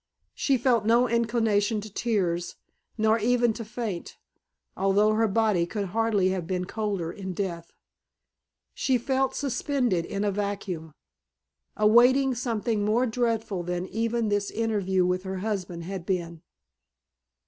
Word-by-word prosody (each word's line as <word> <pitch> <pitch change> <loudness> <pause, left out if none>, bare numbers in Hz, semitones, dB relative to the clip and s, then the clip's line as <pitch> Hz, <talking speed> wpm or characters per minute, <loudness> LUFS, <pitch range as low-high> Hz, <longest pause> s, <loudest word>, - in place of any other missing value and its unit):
She 275 -2 +1
felt 240 -2 +2
no 235 +3 +4
inclination 225 -2 +1
to 210 -1 -10
tears, 180 -8 -1 0.4
nor 220 +1 +3
even 240 +1 +2
to 230 - -6
faint, 215 -4 -5 0.6
although 200 +2 +3
her 225 +1 +2
body 210 -4 +2
could 200 0 -3
hardly 215 -2 +2
have 185 -3 -2
been 180 -1 -1
colder 200 -5 -3
in 190 0 -6
death. 170 -3 -4 1.0
She 260 -2 +1
felt 265 +2 0
suspended 250 - 0
in 200 +3 -3
a 205 - +1
vacuum, 190 -6 -4 0.8
awaiting 245 +5 +5
something 230 -3 -1
more 220 +5 +2
dreadful 225 -5 -1
than 180 +1 -3
even 230 0 -1
this 205 -1 0
interview 200 -5 0
with 180 0 0
her 190 0 -5
husband 185 -4 -3
had 190 0 -5
been. 170 -3 -2
210 Hz, 135 wpm, -26 LUFS, 185-230 Hz, 1.0 s, awaiting